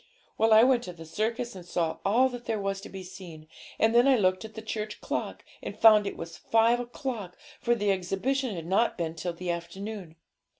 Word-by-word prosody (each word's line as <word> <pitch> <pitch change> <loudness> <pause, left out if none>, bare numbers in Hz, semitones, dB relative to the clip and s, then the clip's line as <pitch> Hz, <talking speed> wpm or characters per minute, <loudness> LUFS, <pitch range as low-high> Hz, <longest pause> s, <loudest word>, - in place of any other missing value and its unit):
Well, 225 0 +2
I 220 +1 +8
went 250 -1 +4
to 180 - -7
the 165 -1 -11
circus 225 +6 -2
and 185 - -9
saw 170 -2 -1
all 235 +7 +4
that 245 -1 -8
there 220 - -1
was 195 0 -2
to - - -10
be 190 -1 -8
seen; 170 -4 -11 0.3
and 225 +1 +3
then 240 +3 +5
I 270 - +6
looked 185 -2 +2
at 220 -1 -10
the 220 - -6
church 215 -1 -4
clock, - - -4 0.2
and - - -7
found 215 -2 +7
it - - -5
was 165 0 -7
five 230 +2 +3
o'clock, 240 - -5 0.2
for 240 0 +2
the 205 -3 +1
exhibition 200 +7 -1
had 165 -2 -6
not 200 +7 +1
been 165 -2 -2
till 165 +2 -4
the 175 +1 -3
afternoon. 175 +1 -6
205 Hz, 215 wpm, -28 LUFS, 180-230 Hz, 0.3 s, I